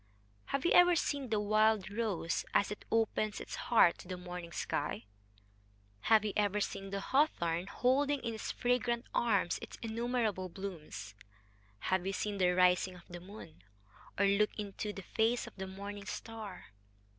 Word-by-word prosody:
Have 275 +2 -2
you - - +3
ever 355 0 +7
seen 285 -5 -1
the 215 -2 +1
wild 215 -1 +3
rose 205 -6 -1
as 200 - +3
it 210 - -7
opens 220 -1 +1
its - - -8
heart 225 -8 +4
to - - -11
the 185 0 -4
morning 180 -1 -7
sky; 145 -8 -2 1.0
have 220 -1 +6
you 210 - -1
ever 210 0 +2
seen 195 -1 -3
the 200 0 -2
hawthorn 185 - +1
holding 275 +7 +2
in 230 -1 -3
its 220 - -4
fragrant 245 -1 0
arms 200 -7 +2
its - - -8
innumerable 225 -4 -1
blooms; 165 - -7 0.8
have 185 -1 +2
you 195 +1 -2
seen 205 0 -2
the 180 -1 +4
rising 180 +1 +3
of 175 - -15
the 175 0 -7
moon, 180 - -12 0.6
or 200 - +4
looked 200 +1 +2
in 205 -2 -4
the 205 -2 -4
face 225 +5 +1
of - - -11
the 190 0 -4
morning 200 +1 -7
star? 215 - -7
205 Hz, 165 wpm, -33 LUFS, 185-225 Hz, 1.0 s, ever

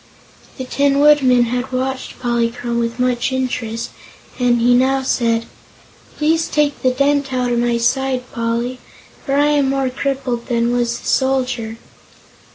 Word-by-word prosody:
The 260 - -5
Tin 280 +2 +1
Woodman 275 -4 +5
had 245 +2 -3
watched 260 +1 -3
Polychrome 235 -1 -1
with 230 0 -2
much 250 0 0
interest, 245 -3 -3 0.5
and 245 -1 +3
he 245 +1 +4
now 265 +2 +2
said: 230 -3 0 0.7
"Please 320 +2 +1
take 295 -1 0
the 255 - +3
dent 280 +1 +1
out 250 -1 0
of 240 - +1
my 240 0 +1
side, 255 +2 0
Poly, 235 +1 -2 0.4
for 275 - -1
I 290 +1 +3
am 285 -2 +2
more 270 -1 0
crippled 260 -3 -3
than 235 -1 +1
was 240 -1 0
the - - -15
Soldier." 255 -4 0
255 Hz, 150 wpm, -18 LUFS, 240-270 Hz, 0.7 s, Woodman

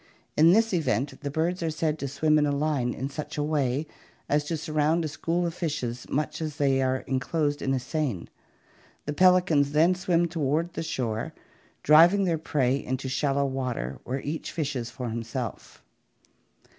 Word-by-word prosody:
In 160 +3 +6
this 225 +2 +3
event, 140 - -1
the 145 - -3
birds 165 +5 -1
are 165 - 0
said 155 0 -1
to 140 - -3
swim 155 +3 +2
in 150 - +2
a - - +1
line 140 -4 0
in 130 - -4
such 150 +1 -6
a 145 - 0
way 145 -2 0 0.4
as 150 +1 +2
to 165 +1 -2
sur 155 0 -6
round 155 +2 +2
a - - 0
school 170 +4 -1
of 170 - -2
fishes 145 -9 -3
much 150 +2 -2
as 155 -2 -3
they 135 -3 +2
are 130 0 0
enclosed 145 +3 -1
in 135 - -1
a 135 - +1
seine. 130 - -2 0.8
The 150 - -2
pelicans 175 -4 +4
then 165 +4 +5
swim 175 -2 +1
toward 165 +1 -1
the - - -4
shore, 115 -8 -3 0.5
driving 170 +7 +6
their 170 -4 0
prey 135 -3 0
into 130 +1 -3
shallow 140 +1 +1
water, 125 - -3
where 130 +2 -3
each 155 +3 -4
fishes 140 -7 -3
for 125 +1 -6
himself. 115 0 -6
150 Hz, 180 wpm, -27 LUFS, 130-160 Hz, 0.8 s, In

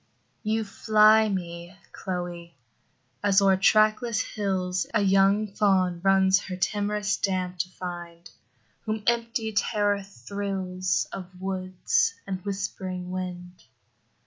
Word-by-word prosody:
You 220 0 0
fly 215 +1 +4
me, 175 -2 -5 0.2
Chloe, 175 -2 -5 0.7
as 195 -1 +5
o'er 195 -1 +4
trackless 215 +3 +3
hills 185 -3 -1
A 210 - +4
young 195 +2 +3
fawn 185 -4 +2
runs 195 0 +4
her 185 - -5
timorous 205 +2 -1
dam 185 -2 -1
to 180 +1 -2
find, 175 -2 -8 0.6
Whom 215 -1 -3
empty 230 -1 0
terror 205 -1 +1
thrills 195 -2 -3
Of 185 -1 -8
woods 190 - 0
and 185 -2 -5
whispering 185 -2 -4
wind. 180 -1 -6
195 Hz, 110 wpm, -26 LUFS, 180-210 Hz, 0.7 s, as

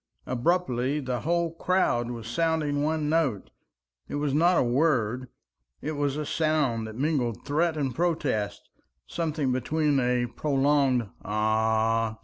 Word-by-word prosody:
Abruptly 130 -1 0
the 130 -3 -2
whole 170 +3 0
crowd 165 -9 +1
was 115 -2 -6
sounding 150 +1 0
one 155 0 0
note. 150 - 0 0.6
It - - -4
was 145 -1 -1
not 175 +4 +4
a - - +4
word, 125 -2 +1 0.5
it 155 - -4
was 145 -1 -1
a 150 - -2
sound 145 -9 0
that 110 - -8
mingled 130 -6 -1
threat 155 +3 +1
and 135 -4 -1
protest, 135 -10 -1 0.4
something 155 - -1
between 145 +3 +1
a 125 -1 +1
prolonged 135 -2 +1 0.2
"Ah!" 110 +1 +1
140 Hz, 130 wpm, -27 LUFS, 120-155 Hz, 0.6 s, not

